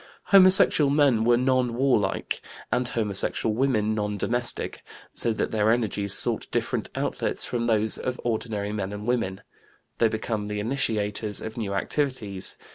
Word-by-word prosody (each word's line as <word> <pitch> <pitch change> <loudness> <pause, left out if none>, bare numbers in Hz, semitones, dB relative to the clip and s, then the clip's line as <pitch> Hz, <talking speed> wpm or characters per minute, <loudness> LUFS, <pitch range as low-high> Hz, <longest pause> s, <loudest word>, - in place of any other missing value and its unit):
Homosexual 185 -6 +7
men 140 -6 +3
were 120 0 +4
non 125 -1 +1
warlike 120 -7 0 0.3
and 125 0 +1
homosexual 110 -1 +1
women 110 -3 +1
non 105 -1 -2
domestic, 120 +4 -1 0.3
so 115 - 0
that 110 - -2
their 110 0 +2
energies 105 -4 0
sought - - 0
different - - -2
outlets - - -2
from 120 -1 -2
those 110 -1 +1
of 125 -1 -4
ordinary 110 -3 -2
men 100 -2 -3
and 105 +1 -7
women; 105 -6 -1 0.6
they 115 - +4
became 110 -1 -3
the 105 0 -3
initiators 105 -3 -1
of 110 - -7
new 100 -4 -3
activities. 110 -5 -2
110 Hz, 145 wpm, -25 LUFS, 105-125 Hz, 0.6 s, Homosexual